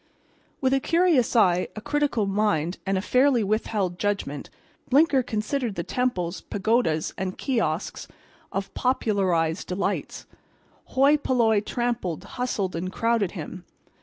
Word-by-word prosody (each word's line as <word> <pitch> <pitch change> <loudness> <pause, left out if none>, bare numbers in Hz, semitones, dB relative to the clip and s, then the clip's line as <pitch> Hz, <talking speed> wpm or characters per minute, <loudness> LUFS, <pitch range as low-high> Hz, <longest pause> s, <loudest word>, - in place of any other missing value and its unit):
With 260 0 +2
a 270 - +3
curious 330 -6 +2
eye, 180 -5 +4
a - - -5
critical 265 -2 0
mind 195 -4 0
and 195 0 +1
a 190 - -2
fairly 255 -1 +3
withheld 200 -3 -1
judgment 200 -9 -2 0.4
Blinker 280 0 +4
considered 230 0 -2
the 170 - -2
temples, 185 -7 -1
pagodas 205 -6 0
and 185 0 -3
kiosks 220 - -2 0.4
of 195 0 -4
popularized 190 -9 0
delights. 185 +2 -3 0.6
Hoi 280 +3 +4
polloi 235 -6 +2
trampled, 235 -7 -2
hustled 210 -8 -3
and 180 +2 -3
crowded 230 -3 0
him. 175 0 -7
215 Hz, 125 wpm, -25 LUFS, 185-250 Hz, 0.6 s, eye